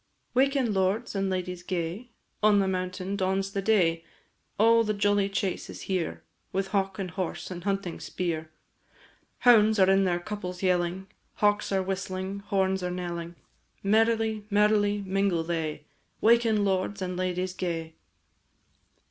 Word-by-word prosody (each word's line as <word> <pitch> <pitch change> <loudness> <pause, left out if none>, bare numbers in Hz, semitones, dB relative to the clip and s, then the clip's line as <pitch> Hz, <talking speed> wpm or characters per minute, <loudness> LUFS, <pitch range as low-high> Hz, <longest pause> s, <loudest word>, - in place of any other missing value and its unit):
Waken, 265 -3 +2
lords 195 +5 0
and 195 -1 0
ladies 180 -1 -3
gay, 180 +6 -4 0.3
On 210 -1 +5
the 195 -1 +2
mountain 185 +1 -2
dawns 195 0 0
the 195 - -2
day, 175 -6 +2 0.5
All 230 +2 +5
the 215 -1 -1
jolly 205 -1 +2
chase 195 -2 -2
is - - -8
here, 165 - -2 0.3
With 195 0 -1
hawk, 195 -2 0
and 190 -3 -4
horse, 185 +1 -4
and 175 -1 -6
hunting 195 -3 -2
spear! 160 -3 -3 0.9
Hounds 220 -3 +6
are 190 -1 +5
in 195 0 +4
their 175 -1 +1
couples 180 -1 -6
yelling, 180 0 +1 0.3
Hawks 205 0 +1
are 190 -1 +1
whistling, 190 +1 -3
horns 190 -2 0
are 180 - -2
knelling, 175 -1 -5 0.5
Merrily, 220 +1 +2
merrily, 205 0 +3
mingle 190 -3 +1
they 160 -3 -3 0.3
"Waken, 225 -2 +4
lords 195 +1 0
and 180 0 -3
ladies 185 0 -2
gay." 165 -3 -3
190 Hz, 140 wpm, -27 LUFS, 180-205 Hz, 0.9 s, Hounds